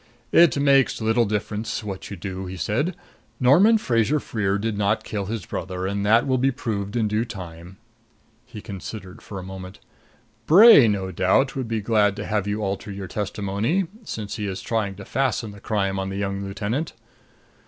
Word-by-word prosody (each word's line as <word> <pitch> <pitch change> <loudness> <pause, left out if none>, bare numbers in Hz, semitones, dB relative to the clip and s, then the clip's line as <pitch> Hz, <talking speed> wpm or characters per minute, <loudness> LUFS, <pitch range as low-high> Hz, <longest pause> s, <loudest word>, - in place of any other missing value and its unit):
"It 165 -6 +6
makes 140 -2 +3
little 110 +1 +2
difference 105 +1 -3
what 100 -3 -6
you 100 - -7
do," 95 +1 -5
he 95 +1 -7
said. 145 - -1 0.4
"Norman 180 - +6
Fraser 125 - +1
Freer 100 -6 -1
did 110 +1 -2
not 100 0 0
kill 100 -3 -4
his 110 -4 -4
brother, 90 0 -4
and 100 +1 -2
that 110 +3 +4
will 130 -2 +1
be 135 +2 +3
proved 110 -6 -4
in 115 -3 +1
due 105 +2 0
time." 90 -4 -9 0.7
He 120 -4 -10
considered 100 -1 -8
for 100 - -8
a 95 - -6
moment. 95 0 -9 0.7
"Bray 185 - +9
no 95 -3 -1
doubt 95 +10 +2
would 130 -3 -3
be 110 -1 -2
glad 105 -2 +2
to - - -5
have 105 -2 -1
you 105 +1 -2
alter 100 +1 -3
your 100 0 -6
testimony, 105 - -1 0.2
since 110 - -5
he 105 -2 -3
is 95 -1 -5
trying 105 -4 -1
to 95 0 -10
fasten 130 -5 -1
the 100 - -12
crime 100 -2 -1
on 95 0 -3
the 95 - -5
young 100 0 -2
lieutenant. 105 +10 -3
105 Hz, 185 wpm, -23 LUFS, 95-120 Hz, 0.7 s, Bray